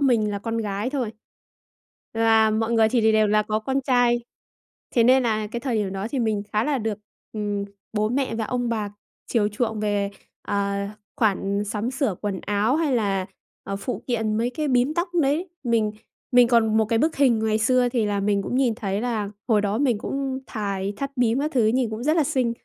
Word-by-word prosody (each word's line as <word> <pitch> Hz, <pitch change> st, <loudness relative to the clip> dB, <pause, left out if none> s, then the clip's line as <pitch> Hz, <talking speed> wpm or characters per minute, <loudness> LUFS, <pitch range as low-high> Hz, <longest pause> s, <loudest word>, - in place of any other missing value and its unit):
mình 235 Hz, -6 st, +3 dB
là 200 Hz, -, -2 dB
con 230 Hz, +2 st, -3 dB
gái 210 Hz, +2 st, -2 dB
thôi. 260 Hz, -6 st, -2 dB, 1.0 s
Và 225 Hz, -1 st, +4 dB
mọi 220 Hz, +1 st, 0 dB
người 225 Hz, -1 st, +4 dB
thì 220 Hz, -2 st, +3 dB
đều 215 Hz, 0 st, +4 dB
là 210 Hz, +1 st, +3 dB
có 215 Hz, +1 st, -1 dB
con 265 Hz, +5 st, -1 dB
trai, 245 Hz, -2 st, +2 dB, 0.7 s
thế 235 Hz, -3 st, +5 dB
nên 260 Hz, +2 st, +5 dB
là 215 Hz, -3 st, 0 dB
cái 235 Hz, +3 st, -5 dB
thời 250 Hz, -2 st, -1 dB
điểm 205 Hz, -3 st, -1 dB
đó 195 Hz, +1 st, -3 dB
thì 275 Hz, -, -2 dB
mình 220 Hz, -4 st, 0 dB
khá 215 Hz, +1 st, +2 dB
là 290 Hz, -1 st, 0 dB
được, 220 Hz, -3 st, -2 dB, 0.3 s
ừm, 205 Hz, -2 st, -2 dB, 0.3 s
bố 215 Hz, -1 st, +1 dB
mẹ 255 Hz, 0 st, -1 dB
và 225 Hz, -1 st, -2 dB
ông 245 Hz, +2 st, -1 dB
bà 220 Hz, -3 st, -1 dB, 0.4 s
chiều 215 Hz, -4 st, +1 dB
chuộng 220 Hz, 0 st, -2 dB
về, 205 Hz, -1 st, 0 dB, 0.3 s
ờ, 200 Hz, 0 st, -1 dB, 0.4 s
khoản 200 Hz, -2 st, +1 dB
sắm 210 Hz, +3 st, -2 dB
sửa 265 Hz, -6 st, 0 dB
quần 200 Hz, -3 st, -3 dB
áo, 210 Hz, +6 st, +1 dB
hay 315 Hz, -3 st, +1 dB
là, 195 Hz, -4 st, 0 dB, 0.4 s
ờ, 195 Hz, -, -3 dB
phụ 245 Hz, +5 st, -4 dB
kiện 220 Hz, -3 st, 0 dB
mấy 235 Hz, +2 st, 0 dB
cái 300 Hz, +3 st, -2 dB
bím 255 Hz, +3 st, +2 dB
tóc 345 Hz, +2 st, 0 dB
đấy. 300 Hz, +7 st, 0 dB, 0.2 s
Mình 225 Hz, -3 st, +1 dB, 0.4 s
mình 245 Hz, -1 st, +6 dB
còn 225 Hz, -2 st, +3 dB
một 220 Hz, -, +4 dB
cái 225 Hz, +1 st, +1 dB
bức 315 Hz, +6 st, +1 dB
hình 260 Hz, -5 st, +4 dB
ngày 220 Hz, 0 st, +1 dB
xưa 250 Hz, +3 st, +3 dB
thì 235 Hz, -3 st, 0 dB
là 205 Hz, -1 st, 0 dB
mình 200 Hz, 0 st, +1 dB
cũng 245 Hz, -, -2 dB
nhìn 255 Hz, -4 st, +2 dB
thấy 200 Hz, -3 st, -2 dB
là 220 Hz, -4 st, -2 dB, 0.2 s
hồi 215 Hz, -3 st, +4 dB
đó 205 Hz, +1 st, -1 dB
mình 250 Hz, -6 st, +2 dB
cũng 270 Hz, +3 st, -3 dB
thài 200 Hz, -3 st, -3 dB
thắt 275 Hz, +4 st, -3 dB
bím 245 Hz, +1 st, +2 dB
các 300 Hz, +2 st, -1 dB
thứ 235 Hz, -4 st, +4 dB
nhìn 240 Hz, +1 st, +1 dB
cũng 220 Hz, +2 st, -5 dB
rất 310 Hz, +3 st, +2 dB
là 315 Hz, -, +3 dB
xinh. 260 Hz, -5 st, 0 dB
225 Hz, 215 wpm, -24 LUFS, 210-250 Hz, 1.0 s, mình